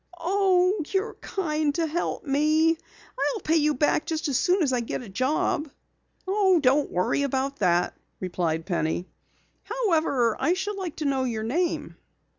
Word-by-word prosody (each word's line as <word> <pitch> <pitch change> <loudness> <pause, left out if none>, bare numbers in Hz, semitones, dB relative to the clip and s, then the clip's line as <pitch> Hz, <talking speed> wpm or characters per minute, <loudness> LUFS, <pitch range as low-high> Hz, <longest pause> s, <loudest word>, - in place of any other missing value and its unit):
"Oh, 370 +1 +2
you're 390 +3 -1
kind 305 -5 -1
to 335 - +1
help 325 +3 -2
me. 310 +3 +3 0.5
I'll 455 - 0
pay 325 -2 +1
you 300 -1 +2
back 295 +3 +1
just 320 -1 -1
as 275 - -1
soon 360 +8 +3
as 270 -4 +1
I 250 - +2
get 235 +1 -4
a 225 - -10
job." 285 +6 0 0.6
"Don't 360 -9 +3
worry 180 +9 0
about 275 0 -1
that," 175 -3 +1 0.2
replied 170 -3 -2
Penny. 175 -1 -1 0.6
"However, 320 - +1
I 300 +6 +2
should 390 +2 -3
like 365 -5 -4
to 310 - -4
know 270 -2 +1
your 225 -3 -2
name." 330 +10 -1
300 Hz, 155 wpm, -26 LUFS, 255-360 Hz, 0.6 s, me